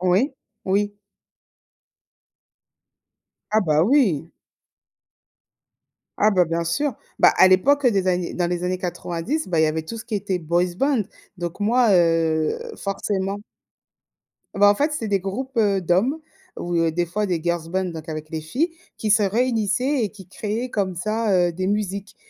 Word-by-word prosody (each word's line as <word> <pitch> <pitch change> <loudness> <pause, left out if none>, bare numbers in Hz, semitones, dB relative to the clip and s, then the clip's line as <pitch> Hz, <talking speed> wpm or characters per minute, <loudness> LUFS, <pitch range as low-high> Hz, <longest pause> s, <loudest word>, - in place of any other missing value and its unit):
Oui, 185 +10 +2 0.3
oui. 205 +2 0 2.6
Ah 215 0 +3
bah, 155 -3 +2
oui! 195 - +2 1.9
Ah 215 +1 +4
bah, 180 -2 +3
bien 165 +1 -1
sûr. 245 - -1 0.3
Bah, - - +6
à - - +8
l'époque 275 +10 +4
des 195 -6 +2
années 180 -1 0
dans 175 -1 0
les 175 0 -2
années 180 +1 -1
90 175 - -3
bah, 165 - +1
il - - +5
y - - +5
avait 155 +1 -1
tout 230 +9 -7
ce 220 - -8
qui 225 - -3
était 195 -2 -2
boys 175 +2 0
band. 275 -2 +2 0.4
Donc 175 +1 -5
moi, 235 +3 +3
heu, 165 -3 +2 0.2
forcément. 195 0 -2 1.2
Bah, 205 +1 +5
en - - 0
fait, 295 +6 0
c'est 225 -6 -3
des 200 -1 +1
groupes, 240 +8 -5
heu, 200 -4 +2
d'hommes 200 - +1 0.4
ou, 175 0 -3
heu, 165 0 +2
des 175 +2 0
fois 210 +5 -2
des 175 -4 -1
girls 170 -1 -1
band, 190 +2 0
donc 165 -2 -7
avec 155 -1 -6
les 160 - -3
filles, 260 - -1 0.3
qui 215 -2 0
se 215 0 +4
réunissaient 230 +4 +1
et 210 - -1
qui 195 -2 -14
créaient 220 +4 -4
comme 195 -5 -1
ça, 215 +5 -1
heu, 175 -1 +3
des 185 +2 -3
musiques. 200 -1 -2
190 Hz, 165 wpm, -22 LUFS, 175-220 Hz, 2.6 s, à